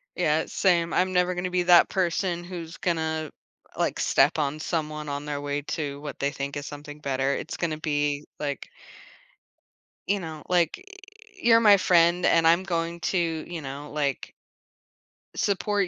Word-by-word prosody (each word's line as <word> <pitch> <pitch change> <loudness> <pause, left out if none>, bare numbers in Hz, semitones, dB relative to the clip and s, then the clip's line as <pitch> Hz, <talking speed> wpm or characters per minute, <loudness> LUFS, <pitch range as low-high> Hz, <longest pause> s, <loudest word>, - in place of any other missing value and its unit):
Yeah, 160 -2 +1
same. 170 -3 +1
I'm 185 +1 +2
never 180 0 +2
gonna 180 +1 -3
be 180 0 +1
that 175 -1 +6
person 175 -1 0
who's 170 -2 -8
gonna, 160 -4 -1 0.4
like, - - -1
step 145 +4 +3
on 150 0 -1
someone 155 -2 -3
on 145 +1 -4
their 145 -1 -3
way 145 0 -2
to 145 -1 -4
what 145 -1 -7
they 140 0 0
think 140 0 -5
is 145 0 -5
something 145 0 -9
better. 135 -1 0
It's - - -5
gonna 160 -3 -2
be, 145 -1 -1
like 145 -2 -4 1.4
you 200 0 +1
know, 160 -4 -7
like, 175 - +2
eh, 405 +1 -18
you're 230 -4 +6
my 205 -3 +7
friend, 175 -1 +4
and 165 -1 +4
I'm 170 +3 +4
going 170 -2 -2
to, 190 - +1
you 165 0 -2
know, 140 +2 -7
like 145 -3 -2 1.0
support 200 -1 0
165 Hz, 165 wpm, -26 LUFS, 145-180 Hz, 1.4 s, my